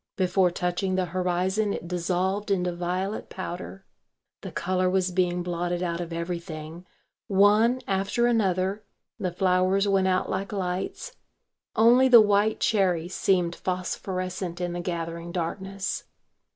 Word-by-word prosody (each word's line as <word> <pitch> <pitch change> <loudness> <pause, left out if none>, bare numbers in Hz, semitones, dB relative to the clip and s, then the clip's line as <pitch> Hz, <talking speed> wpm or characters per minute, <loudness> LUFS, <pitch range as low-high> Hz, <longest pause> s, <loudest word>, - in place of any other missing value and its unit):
Before 185 0 +2
touching 180 +2 -1
the 185 -1 +1
horizon 185 +4 0
it 170 - -6
dissolved 185 +3 -1
into 180 -3 +1
violet 180 +4 -3
powder. 185 +1 -7 0.6
The - - -7
colour 185 +1 0
was 185 0 +1
being 180 -1 0
blotted 175 0 -2
out 170 -1 -2
of 170 -1 -6
everything; 170 0 -5 0.4
one 210 +5 +4
after 195 +5 +1
another 200 -3 +1 0.4
the 185 -3 -1
flowers 185 +2 +2
went 195 -1 +3
out 185 0 +1
like 195 +2 -3
lights; 190 - -3 0.6
only 240 +4 +6
the 245 -2 +9
white 210 0 +3
cherry 180 -6 +1
seemed 180 -2 +1
phosphorescent 185 -1 -3
in 175 -1 -2
the 175 - -3
gathering 170 -1 -4
darkness. 190 +3 -3
185 Hz, 130 wpm, -26 LUFS, 175-195 Hz, 0.6 s, the